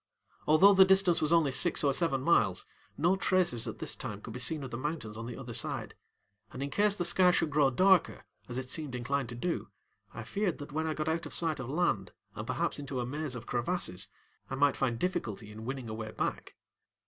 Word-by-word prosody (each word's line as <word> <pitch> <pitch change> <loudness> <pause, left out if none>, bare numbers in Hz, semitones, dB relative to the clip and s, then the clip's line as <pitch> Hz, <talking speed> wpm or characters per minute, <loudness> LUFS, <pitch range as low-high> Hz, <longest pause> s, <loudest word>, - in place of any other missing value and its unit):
Although 180 +7 +7
the 190 0 +8
distance 190 -2 +4
was 155 - 0
only 165 -5 +4
six 130 +3 +2
or 140 -1 +3
seven 135 -4 0
miles, 100 - +2 0.3
no 175 +5 +3
traces 180 -10 +2
at - - -5
this - - -3
time 100 - -6
could 110 +1 -9
be 125 - -6
seen 145 +4 -2
of 130 - -7
the - - -4
mountains 145 -6 -4
on 115 +1 -6
the 120 - -7
other 125 -3 -7
side, 115 - -2 0.6
and 130 - -5
in 140 - -4
case 205 +5 +3
the 175 - +1
sky 180 +1 +5
should 165 -3 +1
grow 145 -1 +4
darker, 185 +6 +3 0.2
as 120 - -3
it 130 -1 -5
seemed 150 -6 -2
inclined 130 +1 -2
to 120 - -6
do, 170 +9 -2 0.4
I 110 - -7
feared 190 - -1
that 145 0 -9
when 160 +2 -1
I 155 - -2
got 155 0 -3
out 160 +1 -1
of - - -5
sight 160 -4 0
of 130 -1 -5
land 135 - 0 0.2
and - - -7
perhaps - - -1
into 135 -2 -4
a 120 - -1
maze 145 +1 -3
of 120 -1 -7
crevasses 120 - -1 0.4
I 135 - -3
might 140 0 +3
find 120 -4 0
difficulty 115 - -3
in 110 +1 -9
winning 130 -1 -4
a 110 - -5
way 110 0 -5
back. - - -4
140 Hz, 230 wpm, -31 LUFS, 120-170 Hz, 0.6 s, the